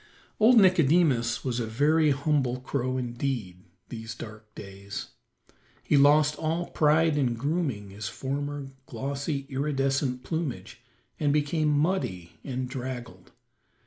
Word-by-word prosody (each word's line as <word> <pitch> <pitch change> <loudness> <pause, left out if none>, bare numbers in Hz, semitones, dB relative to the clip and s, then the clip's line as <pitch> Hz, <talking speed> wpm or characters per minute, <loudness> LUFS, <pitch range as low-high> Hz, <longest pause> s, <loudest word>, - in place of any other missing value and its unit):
Old 230 +3 +6
Nicodemus 160 - +3
was 125 -2 -1
a 115 - -2
very 150 +7 +3
humble 140 -3 +1
crow 130 -1 -2
indeed 120 -6 -3 0.3
these 115 -1 -7
dark 110 -1 -11
days. 100 0 -8 0.7
He - - +2
lost 145 +1 +5
all 165 +2 -2
pride 155 0 +3
in 125 -4 +1
grooming 135 - -2
his 105 +3 -6
former 140 +1 -4 0.2
glossy, 140 +1 -3
iridescent 135 -2 -1
plumage, 160 -6 -4 0.4
and 145 -2 +2
became 150 +1 +1
muddy 145 - 0
and 130 -2 -3
draggled. 125 -2 -7
140 Hz, 115 wpm, -27 LUFS, 120-150 Hz, 0.7 s, Old